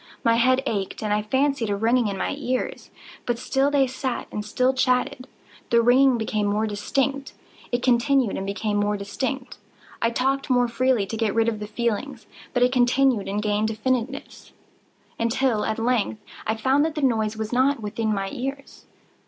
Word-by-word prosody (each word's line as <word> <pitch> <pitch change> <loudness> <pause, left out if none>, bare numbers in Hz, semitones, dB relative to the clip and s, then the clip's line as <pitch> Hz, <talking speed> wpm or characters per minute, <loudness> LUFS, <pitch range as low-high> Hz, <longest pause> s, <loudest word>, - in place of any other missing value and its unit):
My 230 - +4
head 255 +3 +3
ached, 200 -1 -3
and 210 -1 0
I 210 - +1
fancied 265 +1 0
a 200 - +1
ringing 230 +3 +2
in 200 -1 -3
my - - -2
ears: 255 -3 -3 0.4
but 240 -1 0
still 270 +3 +1
they 285 -2 +3
sat 260 0 -4
and 210 - -4
still 250 +5 +1
chatted. 255 0 0 0.4
The 235 - +4
ringing 255 +1 +5
became 215 -2 -1
more 210 +2 +1
distinct:—it 250 +3 -3
continued 250 -1 +2
and 195 - -4
became 205 +1 -1
more 205 0 +1
distinct: 250 +6 -4 0.4
I 230 - +3
talked 270 +4 -1
more 245 -1 +3
freely 245 -2 +1
to 210 - -5
get 220 -2 0
rid 225 0 +3
of 220 -2 -1
the 210 - -5
feeling: 235 +4 -2 0.3
but 245 -1 +2
it 250 - +3
continued 250 -3 +2
and 205 +2 -2
gained 210 0 +1
definiteness—until, 235 0 -3
at 220 - -1
length, 230 -2 0 0.3
I 220 - +1
found 265 +6 +2
that 320 0 -1
the 300 - -2
noise 220 -4 +1
was 220 +1 -4
not 265 +2 +3
within 215 +1 -2
my 195 -2 -2
ears. 275 +2 -6
240 Hz, 175 wpm, -24 LUFS, 215-260 Hz, 0.4 s, ringing